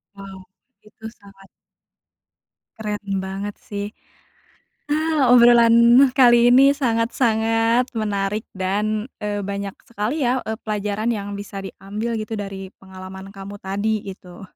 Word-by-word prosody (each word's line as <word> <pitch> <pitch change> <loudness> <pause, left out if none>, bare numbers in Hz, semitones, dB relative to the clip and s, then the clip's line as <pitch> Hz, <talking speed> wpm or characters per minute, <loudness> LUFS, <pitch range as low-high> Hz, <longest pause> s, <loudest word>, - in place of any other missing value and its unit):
Wow, 195 -1 -10 0.5
itu 220 +1 -20
sangat 195 -1 -18 1.3
Keren 205 -3 -4
banget 195 +2 -5
sih. 205 0 -4 1.0
Ah, 305 -4 +2
obrolan 235 -1 +6 0.4
kali 240 -1 +6
ini 275 +3 +6
sangat-sangat 230 -1 +1
menarik 210 -1 -2
dan, 210 +4 -2 0.2
eee, 205 0 -2
banyak 200 -1 -4 0.2
sekali 235 +5 -2
ya, 255 +1 0
eee, 220 0 -5
pelajaran 210 0 -3
yang 205 -1 -5
bisa 200 -1 -7
diambil 215 +4 -5
gitu 215 +1 -5
dari 195 -2 -7
pengalaman 190 0 -10
kamu 195 +1 -9
tadi 205 +2 -1
gitu. 180 -1 -13
210 Hz, 115 wpm, -21 LUFS, 195-230 Hz, 1.3 s, obrolan